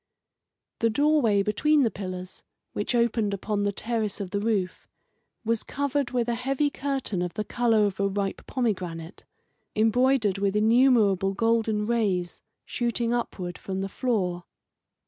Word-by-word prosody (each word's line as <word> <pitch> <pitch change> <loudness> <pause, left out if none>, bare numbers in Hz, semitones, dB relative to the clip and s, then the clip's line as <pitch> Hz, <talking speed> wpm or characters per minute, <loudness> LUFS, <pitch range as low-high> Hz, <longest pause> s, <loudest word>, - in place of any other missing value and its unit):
The 230 - +3
doorway 245 -6 +3
between 285 +9 +3
the 230 - +1
pillars, 185 -1 -7 0.3
which 205 +4 -1
opened 225 -3 +1
upon 205 +1 -2
the 205 0 +1
terrace 220 -1 -2
of 195 -3 -5
the 200 - 0
roof, 205 -4 -1 0.6
was 230 0 +1
covered 280 -2 -1
with 245 -2 0
a 240 - +1
heavy 275 +4 0
curtain 270 -10 -2
of 180 -1 -3
the 215 - -1
colour 225 -1 +2
of 200 -1 -3
a 200 - +2
ripe 195 0 -3
pomegranate, 185 -9 -3 0.5
embroidered 225 -2 +2
with 200 0 0
innumerable 215 -4 +4
golden 225 -1 +1
rays 200 -7 -1 0.2
shooting 235 -1 -1
upward 185 -7 -3
from 190 0 -4
the 195 - -2
floor. 185 -8 -1
215 Hz, 145 wpm, -26 LUFS, 195-240 Hz, 0.6 s, innumerable